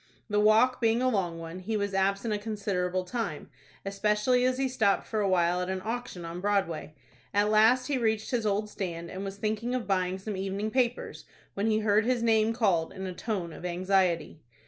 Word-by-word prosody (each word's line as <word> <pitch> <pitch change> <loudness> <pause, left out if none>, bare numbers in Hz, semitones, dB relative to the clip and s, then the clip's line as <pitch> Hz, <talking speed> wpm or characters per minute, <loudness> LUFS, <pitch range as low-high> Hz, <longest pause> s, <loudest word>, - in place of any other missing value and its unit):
The 210 - +3
walk 220 +5 +4
being 225 0 +3
a 255 - +2
long 185 -7 -1
one, 165 +2 -7
he 215 +4 -2
was 200 -1 -2
absent 195 +3 +1
a 205 - -1
considerable 195 -4 -2
time, 230 +5 -4 0.3
especially 210 +5 +1
as 255 0 +1
he 270 0 +1
stopped 220 -6 +1
for 220 - -2
a 200 -2 +1
while 175 -1 +2
at 180 - -3
an 190 0 -2
auction 230 -6 -4
on 170 +2 -6
Broadway. 190 -6 -1 0.4
At 205 +1 +3
last 225 +4 +5
he 275 -2 0
reached 220 -2 0
his 240 -3 0
old 210 0 0
stand, 170 -5 -5
and 190 +1 -5
was 195 0 -6
thinking 220 +4 -2
of 250 - -2
buying 185 -1 0
some 200 +2 -5
evening 195 +3 -3
papers, 250 -1 -1 0.3
when 200 +2 -1
he 220 0 +2
heard 210 +1 +3
his 250 -2 +1
name 220 -1 +3
called 195 -9 +1
in 190 0 -6
a 185 - -4
tone 180 -4 -3
of - - -11
anxiety. 180 -2 0
205 Hz, 205 wpm, -28 LUFS, 185-225 Hz, 0.4 s, last